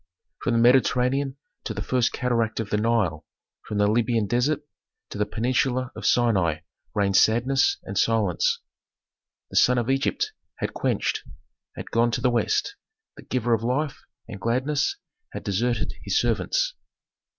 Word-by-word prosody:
From 120 - 0
the 115 - +3
Mediterranean 130 +2 +3 0.3
to 110 - -4
the 100 - -3
first 125 0 +1
cataract 115 -3 0
of 110 -2 -4
the 105 - +2
Nile, 105 -8 +1 0.4
from 105 - -3
the 105 - +3
Libyan 115 +1 +2
desert 125 +8 0 0.5
to 105 - -6
the 105 - +1
peninsula 125 +3 0
of - - -3
Sinai 95 -10 +2 0.3
reigned 100 -2 +1
sadness 125 +6 +3
and 100 - -7
silence. 105 -5 +1 0.9
The - - -1
sun 125 0 +5
of 120 +2 +1
Egypt 135 0 0 0.2
had - - -4
quenched, - - -1 0.5
had - - -8
gone 115 +1 +3
to 125 - -1
the 125 0 +3
West, 120 - 0 0.4
the - - -11
giver 120 -2 -1
of 110 - +1
life 135 +4 -1 0.3
and 100 - -9
gladness 130 +6 0 0.4
had - - -6
deserted 120 +5 -1
his - - +1
servants. - - 0
120 Hz, 150 wpm, -25 LUFS, 105-130 Hz, 0.9 s, sun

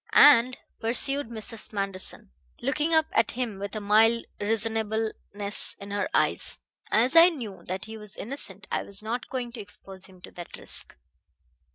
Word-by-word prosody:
"And," 255 -3 +7 0.2
pursued 265 +3 +2
Mrs. 225 -1 -4
Manderson, 195 - -2 0.3
looking 300 +5 0
up 315 -1 +5
at 220 - +3
him 235 -5 -3
with 200 +1 -5
a - - -1
mild 220 +3 +4
reasonableness 220 -1 -1
in 200 0 -8
her 205 0 -1
eyes, - - +1 0.3
"as 245 +7 +3
I 335 +2 +10
knew 220 - -7
that 185 0 -4
he 220 0 -8
was 210 -2 -8
innocent 205 -6 -5
I - - +1
was 200 +1 -5
not 240 +3 -3
going 250 -2 -3
to 235 - -9
expose 195 -2 -7
him 185 -1 -17
to - - -10
that 175 -1 -9
risk." - - -3
220 Hz, 165 wpm, -27 LUFS, 200-245 Hz, 0.3 s, I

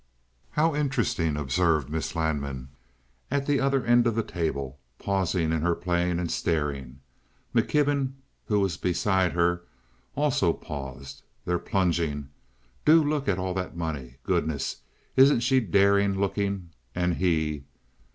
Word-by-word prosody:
"How 160 +1 +2
interesting!" 135 - 0
observed 75 +1 +1
Miss 80 +3 -3
Lanman, 70 -5 -2 0.6
at 140 +1 0
the 145 -1 +2
other 135 -2 +1
end 120 0 +4
of 115 - 0
the 115 - +1
table, 70 -7 -3 0.2
pausing 95 -4 0
in 80 -1 0
her 85 +1 +2
playing 90 -1 0
and 85 -1 -2
staring. 70 -5 -2 0.5
McKibben, 140 +2 +2 0.3
who 105 -1 +2
was 95 -4 0
beside 90 -1 +1
her, 85 0 +2 0.5
also 130 - +2
paused. 70 -1 -8 0.2
"They're 90 0 0
plunging. 85 -7 0 0.5
Do 160 +1 +6
look 145 -1 -1
at 95 - +2
all 95 0 -2
the 90 0 -2
money! 75 -7 -4
Goodness, 80 -3 -1 0.4
isn't 135 -2 +6
she 130 +2 +3
daring 100 -1 +3
looking—and 90 -5 -2
he?" 80 -5 0
90 Hz, 130 wpm, -27 LUFS, 75-110 Hz, 0.6 s, Do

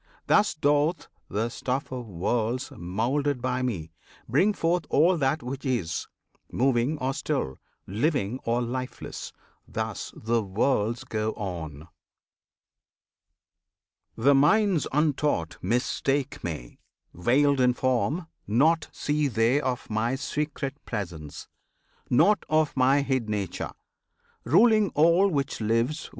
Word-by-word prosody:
Thus 210 - +3
doth 150 +2 +1 0.2
the 110 +4 -1
stuff 130 +3 -3
of 125 -2 -5
worlds, 115 +7 -1
moulded 125 +10 -1
by 125 +1 -1
Me, 90 -11 -3 0.4
Bring 165 - +3
forth 170 -3 0
all 170 +5 +4
that 145 0 0
which 130 +2 -5
is, 120 - -1 0.4
moving 130 +3 +1
or 135 -1 -1
still, 140 - -2 0.3
Living 125 - -1
or 120 +1 0
lifeless! 125 +2 -5 0.4
Thus - - -4
the 115 +1 0
worlds 110 +3 0
go 110 -4 -2
on! 80 -6 -6 2.3
The 135 +5 +5
minds 175 +4 +3
untaught 145 - 0
mistake 130 +5 -1
Me, 75 -8 -6 0.3
veiled 135 - +3
in 125 -1 +4
form; 130 +7 0 0.2
Naught 150 +10 +3
see 150 0 0
they 120 +3 +2
of 130 -2 -2
My 115 +4 0
secret 145 0 -3
Presence, 80 -9 -6 0.6
nought 200 +10 +4
Of 155 -1 +2
My 135 +2 +4
hid 130 -5 -1
Nature, 100 -4 -3 0.7
ruling 215 - +5
all 170 +6 +5
which 140 -7 -2
lives. 115 +8 0
130 Hz, 115 wpm, -26 LUFS, 110-145 Hz, 2.3 s, The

